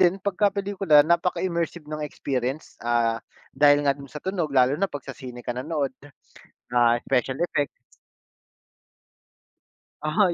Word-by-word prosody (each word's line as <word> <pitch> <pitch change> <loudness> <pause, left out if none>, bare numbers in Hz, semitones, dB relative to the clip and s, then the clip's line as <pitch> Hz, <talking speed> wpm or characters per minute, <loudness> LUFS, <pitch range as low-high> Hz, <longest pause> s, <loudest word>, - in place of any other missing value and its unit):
din 180 0 +4
pagka 200 +1 +2
pelikula 195 -7 +3
napaka-immersive 170 -1 0
ng 155 0 -6
experience, 135 -1 -3
ah, 115 -1 +1 0.3
dahil 145 +1 +5
nga 140 - +4
do'n 140 0 -12
sa 150 +2 -9
tunog, 185 -5 -1
lalo 130 -2 +4
na 195 - +2
'pag 145 -5 -7
sa - - -6
sine 125 -2 -9
ka - - -2
nanood, 140 +2 -2 0.8
ah, 120 -1 +4
special 130 0 +1
effects. 145 -4 0 2.3
Aha, 170 +5 +2
145 Hz, 135 wpm, -25 LUFS, 130-170 Hz, 2.3 s, dahil